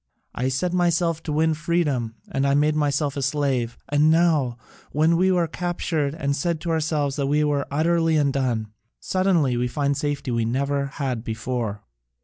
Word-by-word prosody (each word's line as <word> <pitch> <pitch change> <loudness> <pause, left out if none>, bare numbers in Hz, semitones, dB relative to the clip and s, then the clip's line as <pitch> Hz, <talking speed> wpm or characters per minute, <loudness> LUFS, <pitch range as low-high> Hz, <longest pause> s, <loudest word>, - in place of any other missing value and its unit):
I 130 +2 -1
set 155 +7 -1
myself 170 -2 +1
to 155 - -5
win 160 +2 +2
freedom 150 -8 -1 0.2
and 135 0 +1
I 140 - +3
made 150 +1 +3
myself 145 -1 0
a 140 - -2
slave, 135 -4 0
and 145 +2 +3
now, 160 -7 +3 0.3
when 155 +3 +3
we 185 +2 +3
were 175 -2 +2
captured 165 -3 -2
and 140 -3 -1
said 165 +3 -1
to 170 - -2
ourselves 150 -3 0
that 140 -1 0
we 150 +2 +2
were 145 -1 0
utterly 165 +2 +2
undone, 130 -7 0 0.3
suddenly 175 -9 +1
we 125 +1 0
find 140 +2 0
a - - -4
safety 145 -3 -2
we 115 -1 +1
never 140 +4 0
had 130 -4 -3
before. 115 -2 -3
145 Hz, 175 wpm, -23 LUFS, 135-160 Hz, 0.3 s, I